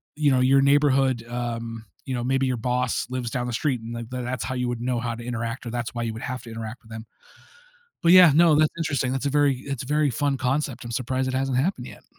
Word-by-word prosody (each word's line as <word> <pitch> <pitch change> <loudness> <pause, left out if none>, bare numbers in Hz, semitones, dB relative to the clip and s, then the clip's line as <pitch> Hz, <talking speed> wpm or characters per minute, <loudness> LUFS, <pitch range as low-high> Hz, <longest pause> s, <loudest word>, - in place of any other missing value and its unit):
you 150 -1 +2
know, 130 -2 +3
your 135 +2 +5
neighborhood, 135 -3 +3
um, 115 -2 -5 0.2
you 130 - -4
know, 120 - -2
maybe 135 +2 +1
your 125 -2 -1
boss 125 +1 -1
lives 125 -2 -3
down 125 +1 -2
the 120 - -4
street 125 0 -1
and, 115 +1 -7
like, 115 -1 -6
that 125 0 -3
that's 125 +1 -3
how 130 - -3
you 125 0 -1
would 120 -1 -3
know 120 -1 -1
how 120 0 -2
to 120 - -9
interact 115 0 -4
or 115 - -4
that's 120 -1 -4
why 120 - -2
you 115 - -2
would 110 - -8
have 125 0 -4
to 115 - -10
interact 115 +1 -7
with 110 - -18
them 110 +1 -7 1.0
but 170 - +5
yeah, 180 -3 +9
no, 170 -1 +6
that's 155 0 +4
interesting, 145 -6 -1
that's 135 +1 -2
a - - +2
very 145 -2 +3
it's 135 -3 -5
a - - -9
very 150 -1 +2
fun 140 +3 0
concept, 130 -1 -2
I'm 120 - -6
surprised 130 +2 -1
it 130 - -2
hasn't 130 -1 0
happened 135 -3 -1
yet. - - -13
125 Hz, 265 wpm, -24 LUFS, 120-135 Hz, 1.0 s, yeah